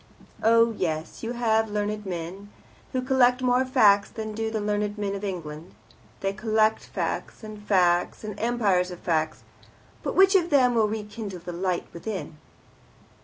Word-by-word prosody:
Oh, 230 +1 +5
yes, 160 -5 -3
you 230 +1 -3
have 220 -2 +1
learned 210 0 -2
men, 180 +3 -6 0.4
who 255 -1 -1
collect 255 -1 +3
more 250 +1 +3
facts 210 -7 +4
than 220 -1 -6
do 225 +1 -2
the 220 -1 -2
learned 210 0 -1
men 200 -1 -2
of 200 0 -5
England. 170 -4 -6 0.5
They 195 0 -1
collect 215 +1 +1
facts, - - -4
and 215 -1 -8
facts, 180 -3 +2
and 210 -1 -4
empires 210 -6 +1
of 180 - -7
facts. 160 -2 -1 0.6
But - - -3
which 385 +1 +6
of 350 -3 +3
them 260 -5 +4
will 225 -2 +3
rekindle 210 -2 -5
the 175 - -6
light 180 0 -1
within?" 180 -4 -6
210 Hz, 160 wpm, -26 LUFS, 185-230 Hz, 0.6 s, which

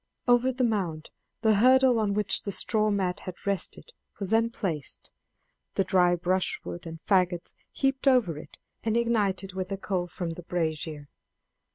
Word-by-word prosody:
Over 245 +1 +4
the 255 0 -1
mound 180 -9 -1 0.3
the 220 -1 +4
hurdle 255 +2 +5
on 205 -2 +1
which 210 0 +1
the 200 - -4
straw 215 +3 +1
mat 190 -3 0
had 185 -2 -9
rested 200 - -3 0.3
was 195 -2 -4
then 225 +1 +3
placed, 170 - -4 0.6
the 195 - +3
dry 180 -2 +3
brushwood 175 -1 -1
and 165 0 -7
faggots 180 -3 +1 0.2
heaped 270 0 0
over 230 - +3
it - - -12 0.2
and 225 0 0
ignited 205 -5 0
with 185 0 -4
a 195 - -1
coal 185 -2 -2
from 175 -1 -4
the 165 - -7
brazier. 160 -3 -3
195 Hz, 160 wpm, -28 LUFS, 175-225 Hz, 0.6 s, hurdle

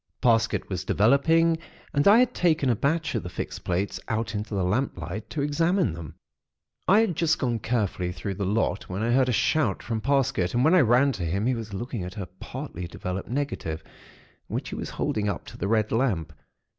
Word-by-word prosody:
Parsket 115 -2 +2
was 95 -2 -3
developing, 160 - +3 0.3
and 145 +3 +3
I 205 +3 +8
had 250 0 +4
taken 155 -7 +2
a - - +2
batch 155 +6 0
of 115 - 0
the 90 - -6
fixed - - -6
plates 90 +3 -1
out 115 0 -2
into 105 0 -3
the 95 - +1
lamplight 105 -1 -2
to 145 - -2
examine 165 - +1
them. 80 -3 -8 0.7
"I 205 +4 +6
had 205 -7 0
just 160 0 +2
gone 120 -3 -1
carefully 105 -6 -1
through 95 +2 -4
the 100 +2 -4
lot, 100 +1 0
when 95 +4 -3
I 120 - +1
heard 130 +1 +3
a - - +3
shout 125 -1 +1
from 115 -2 -2
Parsket, 130 -9 +1
and 125 +2 +3
when 160 - +5
I 185 - +7
ran 125 +3 +4
to 95 -8 -4
him, 95 +6 -1
he 130 - +2
was 115 -3 -5
looking 120 -1 -4
at 90 +4 -7
a 100 - -3
partly 90 0 -7
developed 90 +2 -5
negative, 120 - -3 0.6
which - - -4
he - - -5
was - - -5
holding 105 -1 -1
up 100 - -4
to - - -11
the 100 - -1
red 110 0 +1
lamp. 110 - 0
115 Hz, 205 wpm, -26 LUFS, 95-140 Hz, 0.7 s, I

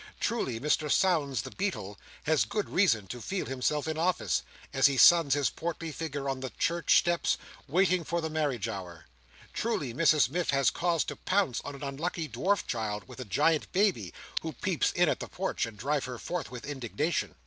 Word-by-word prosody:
Truly, 130 - -1
Mr 150 +3 +1
Sownds 145 - +2
the - - -8
Beadle 185 - -3 0.3
has 155 -1 +3
good 205 0 -2
reason 145 - +3
to 120 +6 -7
feel 190 - -3
himself 135 +4 -1
in 160 0 -2
office, 180 +2 +1 0.3
as 135 0 +6
he 140 -1 -1
suns 160 0 +7
his 145 -3 +1
portly 165 -1 -4
figure 150 -3 -4
on 135 -1 -1
the 130 0 -4
church 170 +5 +2
steps, 175 -1 +2 0.3
waiting 180 +3 +2
for 170 +2 -1
the 160 - -2
marriage 145 -8 -1
hour. 90 -6 -7 0.5
Truly, 150 - -1
Mrs 155 -1 +4
Miff 170 +6 -2
has 140 -1 +3
cause 170 -4 +1
to - - -5
pounce 185 -10 0
on 145 - -6
an 140 - -9
unlucky 155 +4 -3
dwarf 200 +6 0
child, 105 -4 -3
with - - -11
a 130 - -5
giant 150 - +1
baby, 180 - +2 0.3
who - - -5
peeps - - 0
in - - +3
at - - +1
the - - -5
porch, - - -2
and 110 -2 -11
drive 140 +6 -1
her 125 -1 -6
forth 180 +9 -4
with 125 -1 -8
indignation! 145 +3 -2
150 Hz, 190 wpm, -29 LUFS, 125-170 Hz, 0.5 s, suns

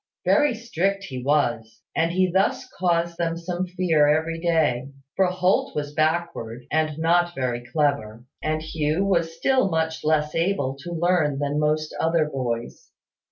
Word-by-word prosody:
Very 295 -5 +3
strict 195 -3 -1
he 130 -9 -6
was; 120 -6 0
and 165 +1 +2
he 185 +1 +2
thus 190 +2 +1
caused 170 -1 0
them 165 -1 0
some 175 +2 -3
fear 175 -5 +2
every 160 +2 +1
day: 155 -7 +1 0.3
for 190 - +3
Holt 180 +1 +1
was 145 -1 -3
backward, 155 -7 -1
and 155 -1 0
not 175 +2 +2
very 120 -2 -2
clever: 125 -6 0 0.2
and 155 0 -1
Hugh 155 +3 -1
was 170 -4 0
still 260 -3 +2
much 160 -1 -1
less 150 -1 +1
able 165 -6 0
to 175 - -7
learn 170 -4 +1
than 145 +1 -1
most 155 0 0
other 165 -1 +2
boys. 120 -5 -4
160 Hz, 155 wpm, -24 LUFS, 145-175 Hz, 0.3 s, Very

